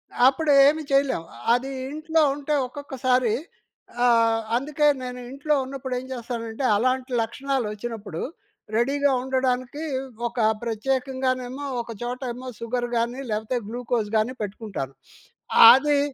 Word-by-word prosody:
ఆహ్, - - -3
అప్పుడు 295 +3 +2 0.2
ఏమీ 310 +2 +2
చేయలేము. 275 -12 +2 0.3
అది 260 +3 0 0.2
ఇంట్లో 320 +1 +1
ఉంటే 295 +1 -1
ఒక్కొక్కసారి 255 -4 0 0.7
ఆహ్, 230 -1 +4 0.2
అందుకే 295 +3 +1 0.2
నేను 250 0 -6
ఇంట్లో 285 +3 -1
ఉన్నప్పుడు 265 -1 -5
ఏం 255 - -9
చేస్తానంటే 235 0 -5
అలాంటి 255 +4 0
లక్షణాలు 265 +2 -2
వచ్చినప్పుడు, 210 -5 -6 0.5
రెడీగా 280 +4 +2
ఉండడానికి 260 +2 -1 0.4
ఒక 240 +1 -6 0.2
ప్రత్యేకంగానేమో 255 +2 -2 0.2
ఒక 235 - -8
చోట 245 +1 -3
ఏమో 255 +1 -8
సుగర్ 240 +1 -2
గాని, 240 +3 -1
లేకపోతే 220 +4 -1
గ్లూకోజ్ 235 -2 -2
గాని 220 +4 0
పెట్టుకుంటాను. 205 - -5 0.8
అది 285 +2 +4
255 Hz, 120 wpm, -24 LUFS, 230-275 Hz, 0.8 s, ఆహ్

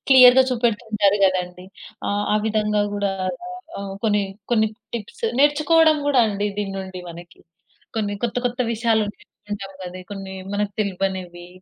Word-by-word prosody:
క్లియర్‌గా 260 -1 +9
చూపెడుతూ 235 -2 0
ఉంటారు 205 -1 +3
కదండీ 180 -1 0 0.4
ఆ! - - -1 0.2
ఆ - - +4
విధంగా 210 -1 +1
కూడా 205 -1 0 0.7
ఆహ్ 200 -1 -5
కొన్ని, 210 -2 +3 0.3
కొన్ని 220 -2 +4 0.3
టిప్స్ 230 0 -6
నేర్చుకోవడం 305 +2 +5
కూడా 275 -3 +4
అండి. 205 0 -1
దీని 200 -1 -2
నుండి 190 -1 -6
మనకి, 170 +1 -12 0.6
కొన్ని 205 -2 -1
కొత్త 230 0 -2
కొత్త 245 +1 -3
విషయాలు 225 -1 +2
నేర్చుకుంటాం 205 -2 -9
గదా! 185 +1 -7
కొన్ని 195 -1 -7 0.2
మనకు 205 0 -1
తెలివనివి. 185 -3 -3
205 Hz, 140 wpm, -22 LUFS, 195-235 Hz, 0.7 s, క్లియర్‌గా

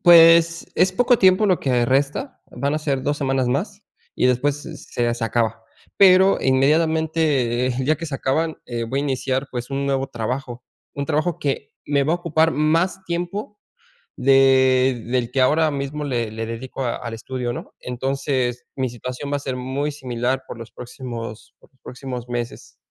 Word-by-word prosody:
Pues, 170 -1 +6
es 185 +2 +3
poco 245 +4 +3
tiempo 190 +2 +5
lo 185 -3 +2
que 125 -3 +2
resta, 140 - 0
van 140 +2 -2
a - - 0
ser 140 -3 -1
dos 145 +1 -1
semanas 135 -2 0
más 195 - -2 0.3
y - - +2
después 135 +3 +2
se 165 - -8
se 120 -1 -2
se 115 - -3
acaba, 115 -1 -1 0.4
pero 190 0 +6
inmediatamente, 150 -2 +2
eh, 130 - 0
el 130 - -1
día 155 +3 +2
que 165 - -6
se 145 - -5
acaban, 155 +5 0
eh, 120 -1 -4
voy 130 +4 -2
a - - -2
iniciar, 135 0 -1
pues, 120 0 -5
un 140 0 -1
nuevo 135 -1 0
trabajo, 125 +1 -5 0.3
un 140 - -3
trabajo 155 +3 0
que 140 0 -3
me 140 -1 +1
va 155 - +1
a - - 0
ocupar 165 -2 +1
más 165 +6 +1
tiempo 180 +4 -4 0.6
de, 130 -2 +4
del 120 -1 -1
que 135 - +1
ahora 155 +4 +3
mismo 140 +2 -4
le 120 -5 -1
le 110 +1 -5
dedico 125 +3 -5
a 120 - -1
al 115 -2 -6
estudio, 120 +1 -4
¿no?, - - -8
entonces 125 -1 -2
mi 130 -1 0
situación 125 +4 -6
va - - +2
a - - -2
ser 130 -2 -4
muy 135 +4 -2
similar 130 -1 -2
por - - -8
los 115 -2 -10
próximos 120 -2 -8
por - - -23
los 130 - -36
próximos 125 -1 -7
meses. 120 - -5
135 Hz, 185 wpm, -22 LUFS, 125-155 Hz, 0.6 s, Pues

